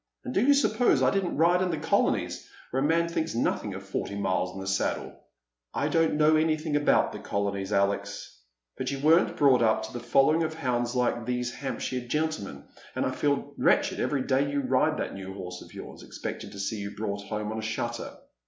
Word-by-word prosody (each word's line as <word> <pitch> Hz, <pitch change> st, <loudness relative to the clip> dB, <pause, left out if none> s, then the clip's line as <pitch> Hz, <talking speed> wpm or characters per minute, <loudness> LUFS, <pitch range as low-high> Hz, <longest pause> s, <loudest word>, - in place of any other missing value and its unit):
And 255 Hz, -, -4 dB
do 200 Hz, -, +3 dB
you 285 Hz, +2 st, +6 dB
suppose 260 Hz, -3 st, +3 dB
I -, -, +4 dB
didn't 195 Hz, -5 st, -1 dB
ride 175 Hz, +3 st, +4 dB
in 185 Hz, -, +1 dB
the 165 Hz, -, -1 dB
colonies, 150 Hz, -, 0 dB, 0.2 s
where 130 Hz, -, 0 dB
a -, -, +2 dB
man 165 Hz, +1 st, +2 dB
thinks 165 Hz, -3 st, -2 dB
nothing 105 Hz, -3 st, -1 dB
of 95 Hz, -, -7 dB
forty 100 Hz, +1 st, -4 dB
miles 95 Hz, -2 st, 0 dB
in -, -, -6 dB
the 95 Hz, -, -6 dB
saddle? 95 Hz, 0 st, -1 dB, 0.3 s
" -, -, -57 dB
"I -, -, 0 dB
don't 165 Hz, -2 st, +2 dB
know 155 Hz, +1 st, +4 dB
anything 155 Hz, -1 st, +1 dB
about 145 Hz, 0 st, +3 dB
the -, -, -7 dB
colonies, 100 Hz, -1 st, -2 dB
Alex, 100 Hz, 0 st, -1 dB, 0.4 s
but -, -, -2 dB
you 140 Hz, -, -2 dB
weren't 155 Hz, +5 st, +3 dB
brought 135 Hz, -4 st, +5 dB
up 110 Hz, -1 st, +3 dB
to 120 Hz, -, -5 dB
following 135 Hz, +6 st, +3 dB
the 160 Hz, -1 st, -1 dB
hounds 120 Hz, -4 st, -1 dB
like 120 Hz, -2 st, 0 dB
these 125 Hz, 0 st, -1 dB
Hamp 135 Hz, -4 st, -5 dB
shire 130 Hz, -, -2 dB
gentlemen, 125 Hz, -, -3 dB, 0.3 s
and -, -, 0 dB
I -, -, 0 dB
feel 145 Hz, -1 st, -1 dB
wretched -, -, +3 dB
every 140 Hz, -3 st, 0 dB
day 140 Hz, +2 st, +1 dB
you 145 Hz, 0 st, 0 dB
ride 135 Hz, +4 st, +2 dB
that -, -, -3 dB
new 95 Hz, 0 st, -7 dB
horse 90 Hz, -2 st, -7 dB
of -, -, -13 dB
yours, -, -, -9 dB
expecting -, -, -6 dB
to 100 Hz, -, -10 dB
see 100 Hz, +3 st, -2 dB
you 100 Hz, 0 st, -6 dB
brought 100 Hz, -1 st, -3 dB
home 105 Hz, +1 st, -3 dB
on 110 Hz, -, -3 dB
a -, -, -3 dB
shutter." 115 Hz, +2 st, -3 dB
125 Hz, 215 wpm, -28 LUFS, 100-155 Hz, 0.4 s, you